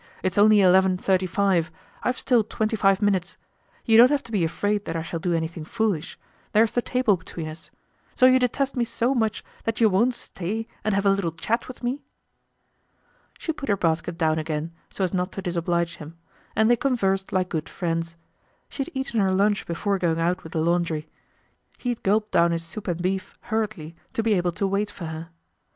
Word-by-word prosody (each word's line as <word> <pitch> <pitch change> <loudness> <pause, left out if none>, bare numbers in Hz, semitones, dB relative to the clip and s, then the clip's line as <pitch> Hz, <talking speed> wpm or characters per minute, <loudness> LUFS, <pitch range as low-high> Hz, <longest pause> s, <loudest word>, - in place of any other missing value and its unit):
It's 185 +2 0
only 210 0 +6
eleven 185 0 +5
thirty 185 0 +1
five. 185 -3 +1 0.3
I've 250 0 0
still 245 -4 +3
twenty 220 +1 -1
five 195 -1 +3
minutes. 190 -3 0 0.5
You 225 -1 +5
don't 240 +2 +9
have 290 -1 +1
to 230 - -11
be 200 -6 +1
afraid 205 +5 -1
that 165 - -4
I 165 - -2
shall 165 0 -4
do 175 +1 -1
anything 165 0 -3
foolish; 195 -3 -2 0.4
there's 220 +1 +4
the 245 - +1
table 245 -6 +2
between 165 -1 -7
us. 155 +1 -9 0.5
So 255 - +5
you 255 0 +6
detest 265 +3 0
me 245 - +1
so 235 +2 0
much 220 -4 0 0.2
that 225 -1 -2
you 225 -2 +5
won't 230 +6 +2
stay 220 +2 -5 0.2
and 215 -2 +1
have 200 0 0
a 200 - +6
little 195 -4 0
chat 170 +9 -2
with 255 -1 -10
me." 255 +4 -2 1.4
She 320 - -3
put 275 -5 -7
her 200 - +3
basket 165 0 0
down 160 -1 +2
again, 155 +1 -3 0.2
so 195 - -3
as 185 - 0
not 180 0 -1
to 195 - -5
disoblige 170 -1 -1
him; 160 +2 -10 0.4
and 220 0 +4
they 240 +1 +4
conversed 195 -9 0
like 185 -1 0
good 155 -3 -3
friends. 165 -1 -3 0.5
She - - -5
had 270 - -3
eaten 265 -4 -1
her 195 -2 +3
lunch 200 +2 +1
before 195 +4 -1
going 165 -2 +1
out 175 +2 0
with 160 - -10
the 160 - 0
laundry. 165 -2 0 0.7
He 245 - -3
had 240 - -2
gulped 210 +2 +1
down 170 0 +4
his 165 0 -2
soup 205 +5 -7
and 175 -2 -1
beef 190 +1 -2 0.2
hurriedly 210 -8 -2 0.2
to 225 - -1
be 220 -1 +3
able 175 -2 +1
to 200 +3 -1
wait 200 +2 0
for 185 -4 -8
her. 160 +1 -6
195 Hz, 205 wpm, -24 LUFS, 170-220 Hz, 1.4 s, don't